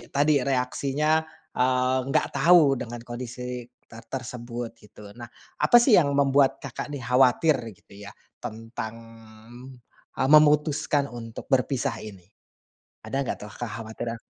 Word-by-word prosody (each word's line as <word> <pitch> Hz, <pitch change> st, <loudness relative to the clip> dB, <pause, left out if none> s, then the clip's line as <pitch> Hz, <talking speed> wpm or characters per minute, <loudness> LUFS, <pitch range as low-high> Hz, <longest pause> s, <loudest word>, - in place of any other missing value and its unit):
tadi 145 Hz, 0 st, +3 dB
reaksinya, 140 Hz, +4 st, +1 dB, 0.3 s
eee, 125 Hz, 0 st, +1 dB
enggak -, -, 0 dB
tahu 150 Hz, -3 st, +5 dB
dengan 120 Hz, 0 st, -6 dB
kondisi 125 Hz, 0 st, -7 dB, 0.2 s
ter 115 Hz, 0 st, -13 dB
tersebut 120 Hz, -2 st, -6 dB
gitu 105 Hz, 0 st, -15 dB
loh. 100 Hz, -, -12 dB
Nah, 120 Hz, -1 st, -10 dB, 0.3 s
apa 240 Hz, -, +6 dB
sih 240 Hz, -1 st, +4 dB
yang 150 Hz, -7 st, +5 dB
membuat 140 Hz, -1 st, +3 dB
Kakak 135 Hz, +1 st, -7 dB
nih 140 Hz, -4 st, -6 dB
khawatir 130 Hz, +5 st, +4 dB, 0.2 s
gitu 100 Hz, -, -18 dB, 0.2 s
ya, -, -, -13 dB, 0.3 s
tentang, 115 Hz, 0 st, -7 dB, 1.2 s
eee, 130 Hz, -, +1 dB
memutuskan 150 Hz, -1 st, +4 dB
untuk 115 Hz, -2 st, -9 dB
berpisah 135 Hz, -1 st, 0 dB
ini? 100 Hz, -5 st, -11 dB, 0.8 s
Ada -, -, -5 dB
enggak 135 Hz, -, -3 dB
tuh 105 Hz, -, -12 dB
kekhawatiran 115 Hz, 0 st, -6 dB
125 Hz, 130 wpm, -25 LUFS, 120-140 Hz, 1.2 s, apa